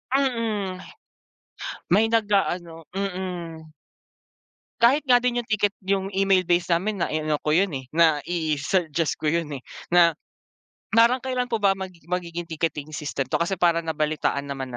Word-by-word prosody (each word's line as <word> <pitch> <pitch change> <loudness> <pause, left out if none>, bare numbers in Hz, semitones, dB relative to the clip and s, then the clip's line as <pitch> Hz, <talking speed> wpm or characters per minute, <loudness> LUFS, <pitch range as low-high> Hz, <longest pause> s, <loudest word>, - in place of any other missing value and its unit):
Mm. 220 -8 -1 1.1
May 205 +5 +5
nag-aano, 190 -7 0
mm. 180 -5 -5 1.1
Kahit 270 +6 +5
nga 250 -3 +5
din 240 -1 0
yung 235 - -26
ticket 205 -1 +1
yung 195 0 0
email 195 -2 +3
base 175 0 +1
namin 185 +2 +1
na - - -2
ano 155 -1 0
ko 150 - +1
yun 190 +5 +4
eh, 130 - -5
na 160 -3 +3
i-suggest 160 0 -1
ko 155 - -2
yun 165 -1 0
eh, - - -23 0.3
na 170 -3 +5 0.8
parang 230 +3 +5
kailan 255 -1 -2
po 225 - +1
ba 200 -2 +3
mag 190 -1 -6 0.2
magiging 175 -1 -3
ticketing 155 -2 -3
system 140 -3 -3
to - - -1
kasi 185 +2 0
parang 170 -1 +3
nabalitaan 150 -2 -1
naman 135 -2 -5
175 Hz, 150 wpm, -24 LUFS, 160-205 Hz, 1.1 s, May